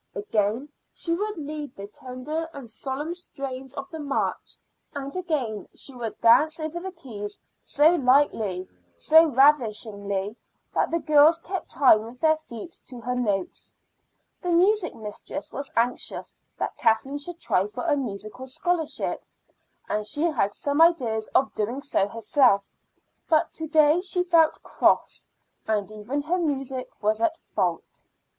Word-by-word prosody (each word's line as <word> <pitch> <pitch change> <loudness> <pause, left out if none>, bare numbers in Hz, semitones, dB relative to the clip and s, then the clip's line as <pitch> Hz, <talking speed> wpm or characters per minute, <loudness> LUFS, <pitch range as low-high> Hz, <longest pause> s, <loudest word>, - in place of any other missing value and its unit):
Again 210 +6 -1 0.2
she 335 - -3
would 415 +3 -2
lead 300 -3 -6
the 200 - -7
tender 260 +9 -5
and 275 -4 -8
solemn 270 +8 -4
strains 270 -6 -7
of 275 -1 -5
the 320 - -6
march; 280 -2 -2 0.4
and 280 +1 -5
again 280 - -2
she 275 - -6
would 235 -4 -5
dance 305 +8 +5
over 315 +2 -3
the 380 +2 -6
keys 210 - -8 0.2
so 300 +3 +4
lightly, 250 - +2 0.3
so 320 - +6
ravishingly, 215 -8 +2 0.4
that - - +1
the 335 - +1
girls 305 0 +5
kept 370 +2 -5
time 250 -6 +5
with 230 +3 -10
their 315 -1 +4
feet 310 0 -10
to 250 - -8
her 250 +2 -2
notes. 205 -7 -2 0.7
The 360 - -3
music 365 +2 +3
mistress 220 +6 -7
was 280 0 -5
anxious 235 +2 -1 0.2
that - - -3
Kathleen 260 +5 +1
should 340 +3 -7
try 190 - +1
for 210 - -6
a 305 -3 +3
musical 230 -1 -5
scholarship, 325 +4 -1 0.6
and 210 - -1
she 295 +5 -1
had 245 -12 +1
some 285 +2 0
ideas 245 -11 +3
of 270 - +3
doing 235 +6 -2
so 195 -8 +1
herself. 225 -1 +3 0.7
But 320 0 +3
to 320 - -5
day 310 +1 +4
she 365 -1 0
felt 330 -3 +3
cross, - - +1 0.4
and 210 -1 0
even 225 +7 -3
her 350 +5 0
music 270 -5 -2
was 215 +1 +1
at 325 +7 +1
fault. - - -3
275 Hz, 150 wpm, -25 LUFS, 220-320 Hz, 0.7 s, so